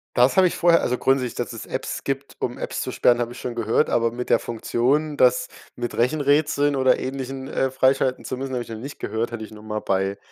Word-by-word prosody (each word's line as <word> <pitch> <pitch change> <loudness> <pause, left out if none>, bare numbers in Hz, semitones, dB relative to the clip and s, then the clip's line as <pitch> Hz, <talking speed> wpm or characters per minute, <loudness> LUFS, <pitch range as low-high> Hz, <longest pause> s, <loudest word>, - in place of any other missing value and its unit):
Das 125 +7 +4
habe 190 - +7
ich - - -3
vorher 170 -1 +4
also, 125 - 0
grundsätzlich, 130 -2 +1
dass 120 0 -3
es 115 - -7
Apps - - -4
gibt, 135 0 -4
um 125 - -3
Apps - - -3
zu 130 - -3
sperren, 120 -1 +3
habe 120 -1 -2
ich - - -10
schon 125 -2 -5
gehört, 115 +5 +1
aber 115 -1 +2
mit 125 +1 -5
der - - +5
Funktion, 140 +6 0
das 125 0 +4 0.3
mit 120 -1 -4
Rechenrätseln 145 +2 +2
oder 130 -1 +3
Ähnlichem, 135 0 -5
äh, 135 -1 0
freischalten 130 0 +2
zu 130 - -4
müssen, 135 0 -4
habe 125 - -1
ich - - -9
noch 115 - -5
nicht 140 +6 -8
gehört, 115 +1 -2
hatte 120 -2 -5
ich 110 - -9
nur 105 -1 -12
mal 110 0 -3
bei 95 0 -1
125 Hz, 240 wpm, -23 LUFS, 120-135 Hz, 0.3 s, habe